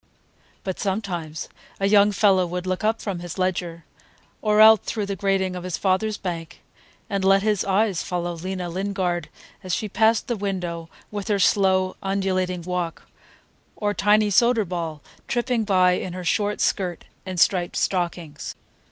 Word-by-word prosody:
But 190 -2 -4
sometimes 185 -6 -3 0.3
a 195 - +1
young 205 0 +5
fellow 190 -2 +3
would 180 +1 -4
look 185 +3 -2
up 220 +1 0
from 195 -4 -3
his 175 0 -7
ledger, 175 -3 -2 0.6
or 210 -1 +2
out 220 -1 +8
through 215 -3 -2
the 200 0 -3
grating 190 -1 0
of 180 - -6
his 180 -2 -3
father's 205 +2 +1
bank, 170 -3 -6 0.4
and 200 -2 -2
let 195 +1 +4
his 210 -3 +1
eyes 195 -1 +1
follow 175 -1 -3
Lena 180 +2 -4
Lingard, 185 -1 -2 0.3
as 185 -1 -1
she 215 - -3
passed 220 +2 +2
the 240 - 0
window 180 -5 -4 0.2
with 205 -2 -5
her 210 -2 +2
slow, 190 -1 +2
undulating 185 -2 -1
walk, 180 -2 -3 0.7
or 205 -1 -1
Tiny 210 +1 +3
Soderball, 185 - +1 0.3
tripping 240 -2 0
by 185 -3 +4
in 180 0 -2
her 180 0 -6
short 205 +3 0
skirt 180 -3 -1 0.2
and 185 -2 -4
striped 175 0 +2
stockings. 170 -5 -2
190 Hz, 155 wpm, -23 LUFS, 180-205 Hz, 0.7 s, out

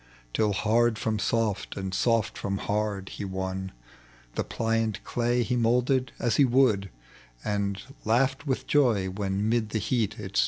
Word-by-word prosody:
Till 105 -2 +2
hard 110 +3 +2
from 110 -1 -1
soft," 110 -2 -1
and 95 -1 -3
soft 115 -1 +1
from 100 0 -2
haxd, 100 -1 -2
he - - -6
won. 95 0 -3 0.6
The - - -1
pliant 115 -2 -1
clay 120 0 +1
he 125 +2 -1
moulded 125 +2 +2
as 120 - +1
he 145 - +6
would, 120 -7 +3 0.6
And 100 -1 -1 0.2
laughed 135 +6 +1
with 130 - -1
joy 115 -10 +2
when 100 +1 -1
'mid 115 -1 +1
the 110 - -1
heat 110 0 0
it 100 -1 -5
stood - - +6
110 Hz, 160 wpm, -27 LUFS, 100-120 Hz, 0.6 s, he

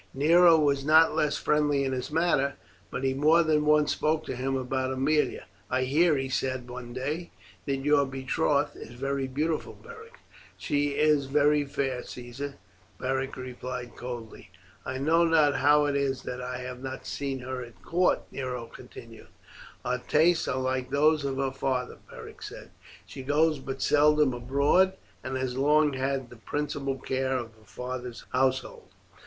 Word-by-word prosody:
Nero 165 +4 +6
was 140 -3 +2
not 160 +2 +5
less 150 -1 +1
friendly 145 -2 +1
in 135 - -1
his 125 -1 -3
manner, 150 -4 +1 0.3
but 125 - -5
he 135 0 +1
more 155 +5 +4
than 155 -1 +2
once 150 -1 +4
spoke 155 +1 0
to - - -4
him 135 +2 -2
about 130 0 -2
Aemilia. 145 +4 +1 0.3
"I 130 0 +1
hear," 150 +4 +3
he 135 0 -2
said 130 -1 -2
one 125 -1 -8
day, 145 +7 -4 0.4
"that 140 - +1
your 145 -1 +4
betrothed 140 +2 0
is 115 - -10
very 135 +1 -2
beautiful 150 +4 -2
Beric." 465 +1 -13 0.4
"She 145 0 -1
is 150 -2 +3
very 145 +1 +3
fair, 135 -2 -2
Caesar," 125 +3 -7 0.4
Beric 135 +1 -2
replied 125 -1 -6
coldly. 120 -3 -8 0.4
"I 130 - -3
know 160 +5 +3
not 155 -4 +3
how 150 +1 +4
it 145 -1 0
is 135 -1 -1
that 125 0 -5
I 125 0 -4
have 125 0 -7
not 130 0 -6
seen 135 -2 -4
her 130 0 -5
at 115 -6 -15
court," 180 +2 +2
Nero 125 -3 -4
continued. 115 - -13 0.6
"Her 125 0 -1
tastes 160 +2 +3
are - - -1
like 130 -1 -1
those 150 +2 +3
of 135 -1 -2
her 135 -1 0
father," 130 -2 -2
Beric - - -11
said. - - -9 0.3
"She - - -9
goes 150 +3 +2
but 135 0 -5
seldom 150 -2 +4
abroad, 140 +10 +2 0.3
and 130 0 -3
has 130 -1 -2
long 150 +1 +4
had 135 -1 -2
the 120 - -12
principal 140 +3 -3
care 130 0 -1
of 120 -2 -5
her 110 0 -23
father's 125 -1 -7
household." 130 +1 -1
135 Hz, 165 wpm, -28 LUFS, 130-150 Hz, 0.6 s, Nero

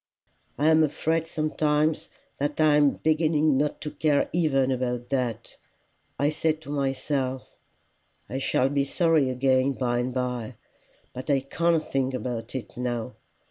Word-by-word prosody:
I 145 - 0
am 160 0 +5
afraid 160 +2 0
sometimes 155 -1 0 0.3
that 145 +2 -2
I 155 -1 +5
am 145 -1 +5
beginning 155 -2 +3
not 145 +2 0
to 150 - -5
care 150 -2 +1
even 135 -6 +2
about 125 -1 -2
that. 120 -4 -3 0.6
I 145 - +2
say 155 +1 +1
to 155 -2 -10
myself, 135 -1 -2 0.8
I 130 - -4
shall 130 0 +1
be 140 0 +1
sorry 160 -1 +2
again 130 +1 +2
by 120 -2 -1
and 125 +1 -1
by, 125 -2 -3 0.6
but 130 +4 -7
I 140 -2 +3
can't 165 +4 0
think 135 -1 -1
about 120 -1 -5
it 130 - -6
now. 120 -1 -3
140 Hz, 145 wpm, -26 LUFS, 130-155 Hz, 0.8 s, am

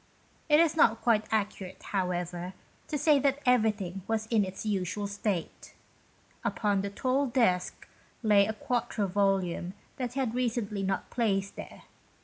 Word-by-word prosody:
It 300 0 +6
is 325 -1 +4
not 230 -7 +4
quite 220 -3 +3
accurate, 200 -3 -2
however, 180 -1 -2 0.3
to 300 - -2
say 295 0 +4
that 275 0 +2
everything 215 -6 +2
was 220 -1 0
in 220 -3 +4
its 190 +2 -6
usual 200 0 -1
state. 200 -3 -4 0.7
Upon 205 -3 +1
the 200 - -3
tall 260 +6 0
desk 230 -8 +1 0.4
lay 205 -2 +5
a 220 - -2
quarto 235 -1 -1
volume 190 -2 0 0.2
that 245 -2 -3
he 275 - -3
had 255 -4 0
certainly 235 -5 -1
not 195 0 -2
placed 200 -5 0
there. - - -10
210 Hz, 145 wpm, -29 LUFS, 195-240 Hz, 0.7 s, It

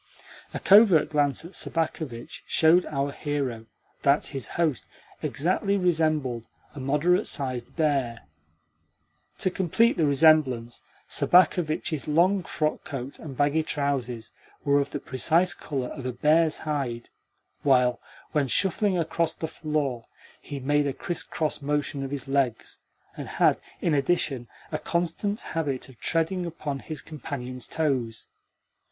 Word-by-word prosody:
A - - -4
covert 195 -7 +6
glance 145 0 +1
at 170 - -9
Sobakevitch 155 -9 -3
showed 165 +3 +4
our 140 -1 -1
hero 135 -7 -3 0.3
that 140 +1 +3
his 135 -6 -4
host 160 -7 0 0.3
exactly 190 +6 0
resembled 155 - +1 0.3
a 150 - -8
moderate 150 +8 +2
sized 130 -5 -2
bear. 140 -8 0 1.2
To 185 - +2
complete 190 +7 +2
the 155 - +3
resemblance, 140 -5 +3 0.3
Sobakevitch's 165 -4 +2
long 180 +6 +3
frockcoat 145 -5 -3
and 140 -5 -8
baggy 145 +2 +2
trousers 135 -7 -2 0.3
were 140 0 +4
of 140 - -1
the 145 - -4
precise 165 +8 +2
colour 135 -5 -4
of 130 - -6
a - - -1
bear's 155 +5 +3
hide, 135 -6 -3 0.5
while, 125 -3 +3 0.3
when 145 -3 +1
shuffling 190 - +2
across 165 0 0
the 160 - -4
floor, 150 -7 -2 0.3
he 145 - -6
made 145 +2 +1
a 140 - -1
criss 175 +4 -3
cross 155 -2 -2
motion 145 -1 -1
of 135 - -4
the 140 0 -5
legs, 135 -5 -1 0.4
and - - -6
had, - - +2 0.2
in 165 - +1
addition, 140 -4 0 0.2
a - - -2
constant 175 +5 -1
habit 140 -6 -3
of 125 - -17
treading 170 +2 0
upon 150 -4 -4
his 155 +1 -7
companion's 130 -5 -6
toes. 130 -8 -1
145 Hz, 135 wpm, -26 LUFS, 135-165 Hz, 1.2 s, covert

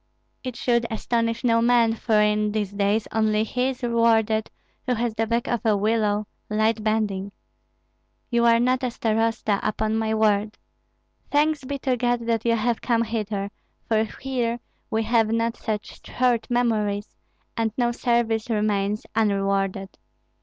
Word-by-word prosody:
It 255 -2 -5
should 235 -1 +1
astonish 230 +1 -1
no 230 -2 +3
man; 235 -1 +4
for 220 -1 +1
in 210 0 +2
these 210 -3 -1
days 205 +2 0
only 215 -1 +2
he 250 +3 -1
is 260 -1 -7
rewarded 225 -2 +2 0.4
who 250 - +2
has 235 0 -1
the 225 +1 -1
back 235 +1 0
of 240 - -1
a 215 -2 +3
willow, 210 0 +1 0.2
light 215 +1 +1
bending. 205 -3 -1 1.0
You 235 0 +3
are 230 0 +5
not 255 +2 +2
a 255 - 0
starosta, 225 -3 0
upon 215 +1 -1
my 220 0 0
word! 210 -1 +1 0.7
Thanks 295 0 +2
be 280 +2 -3
to 260 -2 -1
God 245 0 +1
that 230 -1 0
you 230 0 +3
have 230 +1 0
come 230 -2 +1
hither, 210 -3 -3 0.4
for 220 -1 +2
here 245 -3 -2 0.3
we 220 0 0
have 225 -1 +2
not 230 +1 0
such 215 -2 -5
short 245 -3 0
memories, 215 -4 0 0.4
and 225 -2 0
no 240 -1 +2
service 235 -2 0
remains 210 -1 0
unrewarded. 195 -2 0
225 Hz, 155 wpm, -24 LUFS, 215-235 Hz, 1.0 s, are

